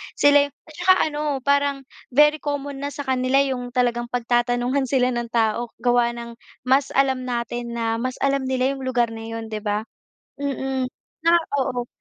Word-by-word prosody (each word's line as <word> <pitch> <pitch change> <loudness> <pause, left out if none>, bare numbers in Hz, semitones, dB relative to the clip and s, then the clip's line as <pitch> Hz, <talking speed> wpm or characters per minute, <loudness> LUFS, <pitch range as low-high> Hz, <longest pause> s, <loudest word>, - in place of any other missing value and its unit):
Sila 285 0 +5
yung 285 - -21
at 310 - -15
saka 375 - +6 0.2
ano, 295 - -4 0.2
parang 280 0 +1 0.3
very 300 +1 +6
common 285 -1 -4
na 285 - -3
sa 285 - -4
kanila 255 0 0
yung 255 -3 -3
talagang 240 -1 +1
pagtatanungan 245 +2 0
sila 255 -1 +2
ng 240 -1 -2
tao 230 0 0 0.2
gawa 240 -1 +3
ng 235 0 -8 0.2
mas 265 +2 +3
alam 265 -2 +2
natin 240 0 -3
na 225 -1 -1
mas 255 +2 -2
alam 275 -1 +1
nila 260 0 +1
yung 270 - -8
lugar 240 -2 +1
na 225 0 -7
'yon, 225 -1 -6
di 215 - -3
ba? 210 0 -1 0.6
Mm, 270 -2 -2 0.4
tsaka 340 0 +6 0.3
oo. 245 -2 -3
255 Hz, 175 wpm, -23 LUFS, 235-275 Hz, 0.6 s, saka